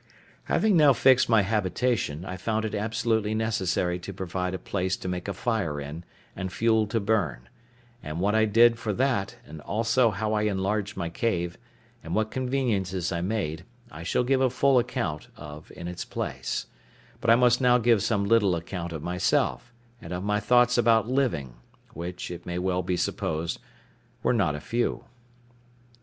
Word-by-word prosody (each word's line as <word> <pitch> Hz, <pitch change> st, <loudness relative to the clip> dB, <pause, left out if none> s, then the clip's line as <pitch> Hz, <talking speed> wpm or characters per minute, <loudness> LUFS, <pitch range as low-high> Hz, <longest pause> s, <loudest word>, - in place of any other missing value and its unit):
Having 210 Hz, -5 st, +3 dB
now 150 Hz, -3 st, +7 dB
fixed 130 Hz, 0 st, +4 dB
my 110 Hz, -3 st, +5 dB
habitation, 105 Hz, -4 st, -1 dB
I 90 Hz, -, -5 dB
found 110 Hz, +4 st, -1 dB
it 110 Hz, -, -4 dB
absolutely 110 Hz, 0 st, 0 dB
necessary 95 Hz, -5 st, 0 dB
to 90 Hz, -, -7 dB
provide 90 Hz, 0 st, -3 dB
a -, -, -2 dB
place 95 Hz, +1 st, -2 dB
to -, -, -7 dB
make 90 Hz, 0 st, -3 dB
a 100 Hz, -, -2 dB
fire 95 Hz, -10 st, -1 dB
in, 75 Hz, +4 st, -7 dB, 0.3 s
and 95 Hz, 0 st, -4 dB
fuel 110 Hz, +1 st, +2 dB
to 115 Hz, +2 st, 0 dB
burn: 90 Hz, -, -1 dB, 0.5 s
and 75 Hz, +2 st, -5 dB
what 100 Hz, +3 st, +1 dB
I 110 Hz, 0 st, +4 dB
did 115 Hz, +2 st, +5 dB
for 110 Hz, -3 st, -2 dB
that, 125 Hz, -3 st, 0 dB
and 75 Hz, 0 st, -10 dB
also 115 Hz, -, +2 dB
how 110 Hz, +1 st, -2 dB
I 105 Hz, -, +1 dB
enlarged 100 Hz, +2 st, -2 dB
my 85 Hz, -3 st, -2 dB
cave, 85 Hz, -4 st, -1 dB, 0.5 s
and 80 Hz, +2 st, -4 dB
what 110 Hz, 0 st, 0 dB
conveniences 110 Hz, -9 st, -1 dB
I 85 Hz, -1 st, -2 dB
made, 90 Hz, -5 st, -2 dB, 0.3 s
I 80 Hz, -, -9 dB
shall 90 Hz, +8 st, 0 dB
give 130 Hz, +1 st, +2 dB
a 130 Hz, -, +4 dB
full 130 Hz, +1 st, +3 dB
account 120 Hz, -, -3 dB
of 75 Hz, +1 st, -10 dB
in 85 Hz, -, -7 dB
its 90 Hz, 0 st, -5 dB
place; -, -, -4 dB, 0.5 s
but -, -, -1 dB
I 115 Hz, -, +8 dB
must 125 Hz, +1 st, +4 dB
now 125 Hz, -1 st, +5 dB
give 115 Hz, -3 st, +3 dB
some 100 Hz, -1 st, +1 dB
little 100 Hz, -4 st, +3 dB
account 85 Hz, +1 st, -5 dB
of 80 Hz, -2 st, -6 dB
myself, 120 Hz, +7 st, 0 dB, 0.3 s
and 85 Hz, -, -9 dB
of 90 Hz, +1 st, -4 dB
my 105 Hz, +1 st, +1 dB
thoughts 120 Hz, +2 st, +4 dB
about 115 Hz, -1 st, +3 dB
living, 75 Hz, -, -1 dB, 0.4 s
which, 85 Hz, +2 st, -6 dB
it 85 Hz, -, -8 dB
may 90 Hz, 0 st, -3 dB
well 90 Hz, 0 st, 0 dB
be 90 Hz, 0 st, -1 dB
supposed, 80 Hz, -1 st, -2 dB, 0.6 s
were -, -, +3 dB
not 95 Hz, -10 st, +1 dB
a -, -, -5 dB
few. 120 Hz, +8 st, -1 dB
105 Hz, 175 wpm, -26 LUFS, 90-115 Hz, 0.6 s, I